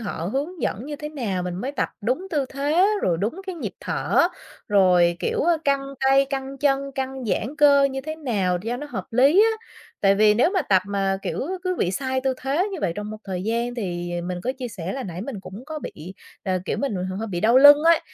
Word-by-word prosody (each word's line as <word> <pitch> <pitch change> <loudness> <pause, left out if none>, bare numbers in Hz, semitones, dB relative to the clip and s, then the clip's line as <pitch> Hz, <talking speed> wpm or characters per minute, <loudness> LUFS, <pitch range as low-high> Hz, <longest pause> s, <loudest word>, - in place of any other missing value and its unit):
họ 190 -6 -4
hướng 305 +6 -3
dẫn 230 +7 -2
như 295 0 -5
thế 300 +1 -6
nào, 225 -12 -3
mình 180 -1 -4
mới 255 +10 -4
tập 285 - -1
đúng 255 - -1
tư 290 -4 +1
thế, 295 +7 +2 0.2
rồi 170 -2 +2
đúng 235 - -2
cái 375 - -4
nhịp 330 - -5
thở, - - 0 0.5
rồi, 180 -4 +4
kiểu, - - 0 0.2
căng 275 -1 0
tay, 270 +1 +4
căng 270 0 -5
chân, 275 0 +1
căng 265 -1 -4
giãn 235 +6 -2
cơ 285 -2 +6
như 270 -1 -1
thế 310 +3 -6
nào 200 - 0
cho 235 +3 -2
nó 295 - -6
hợp - - -4
lý 280 - +5
á. 450 0 -1 0.4
Tại 195 -1 +5
vì 210 +1 +5
nếu 245 +10 +3
mà 380 -3 +1
tập 190 -8 +3
mà, 195 -1 0
kiểu, - - -3 0.2
cứ 365 0 -1
bị 175 - +1
sai 260 +6 -1
tư 265 0 0
thế 295 +9 0
như 375 - -4
vậy 170 - 0
trong 210 0 -5
một 215 - -6
thời 185 -2 -4
gian 235 +3 -1
thì 175 -6 -4
mình 180 0 -4
có 255 - 0
chia 250 -2 -4
sẻ 185 -4 -5
là 270 - -4
nãy 180 -4 -6
mình 225 -3 -6
cũng 195 +5 -10
có 315 0 -5
bị 180 - -9 0.3
là, 185 -1 0
kiểu, - - -2
mình 275 -7 -1
bị 180 - -2
hơ 185 - -4 0.2
hơi 175 - -2
đau 230 +5 +4
lưng 290 +1 +9
ấy, 335 0 +5
255 Hz, 240 wpm, -23 LUFS, 195-280 Hz, 0.5 s, lưng